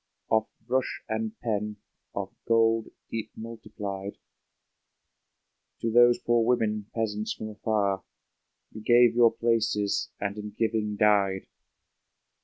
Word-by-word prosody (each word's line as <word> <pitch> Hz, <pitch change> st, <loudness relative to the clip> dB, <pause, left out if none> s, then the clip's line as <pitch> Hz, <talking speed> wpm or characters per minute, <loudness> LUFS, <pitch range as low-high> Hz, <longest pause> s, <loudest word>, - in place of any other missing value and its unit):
Of 110 Hz, 0 st, +3 dB, 0.2 s
brush 130 Hz, +2 st, -1 dB
and 110 Hz, -1 st, -3 dB
pen, 105 Hz, -2 st, -2 dB, 0.4 s
of -, -, -4 dB
gold 115 Hz, -1 st, +3 dB, 0.2 s
deep 115 Hz, -1 st, -4 dB
multiplied, 105 Hz, -3 st, -6 dB, 1.6 s
To 115 Hz, -, 0 dB
those 120 Hz, +1 st, +6 dB
poor 120 Hz, -1 st, +2 dB
women, 110 Hz, -3 st, +1 dB
peasants 110 Hz, -2 st, -1 dB
from 110 Hz, -, -6 dB
afar. 105 Hz, -2 st, 0 dB, 0.7 s
You 110 Hz, -, -9 dB
gave 120 Hz, +1 st, +5 dB
your 120 Hz, -1 st, +6 dB
places, 110 Hz, -3 st, 0 dB
and 100 Hz, +1 st, -3 dB
in 105 Hz, -1 st, -7 dB
giving 110 Hz, -2 st, 0 dB
died 100 Hz, -3 st, +3 dB
110 Hz, 110 wpm, -28 LUFS, 105-115 Hz, 1.6 s, those